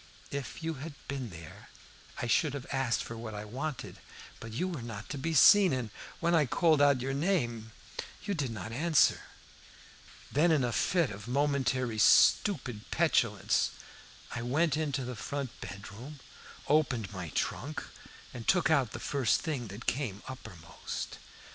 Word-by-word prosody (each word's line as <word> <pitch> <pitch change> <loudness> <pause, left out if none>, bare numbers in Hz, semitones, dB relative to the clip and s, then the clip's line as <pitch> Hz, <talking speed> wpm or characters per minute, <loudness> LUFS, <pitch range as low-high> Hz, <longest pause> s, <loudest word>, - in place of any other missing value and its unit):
If 140 +3 -5
you 165 0 -1
had 155 -1 -7
been 135 -4 -4
there 85 -3 -11 0.5
I - - -1
should 145 +4 +2
have 135 -2 -6
asked 135 -4 0
for 115 - -7
what 115 -2 -6
I 105 +1 -5
wanted, 130 +6 -5 0.4
but 115 - -8
you 155 +12 -1
were 170 -8 -4
not 115 -1 -7
to 145 - -4
be 160 +4 -1
seen, 195 +4 +8
and 125 -5 -2 0.3
when 170 0 +1
I 155 -5 +4
called 155 +2 +3
out 140 -3 +5
your 135 +2 -2
name 120 - 0 0.5
you 200 - -1
did 145 -8 -1
not 110 -2 -6
answer. 155 +5 +3 1.1
Then, 165 +5 +4
in 150 -5 +3
a 120 - 0
fit 145 - +2
of 100 +2 -8
momentary 130 -4 +1
stupid 125 - +4
petulance, - - +2 0.6
I 120 - -4
went 145 +5 +1
into 145 -4 -1
the 125 0 -5
front 140 +2 -5
bedroom, 105 +9 -8 0.5
opened 130 -9 +1
my 90 -3 -5
trunk, 150 +4 -2 0.5
and 115 -2 -8
took 180 -4 +4
out 135 -8 +2
the - - -5
first 135 -5 +1
thing 140 -8 -3
that 105 +4 -9
came 120 -7 -2
uppermost. 90 -11 -7
130 Hz, 160 wpm, -31 LUFS, 115-150 Hz, 1.1 s, seen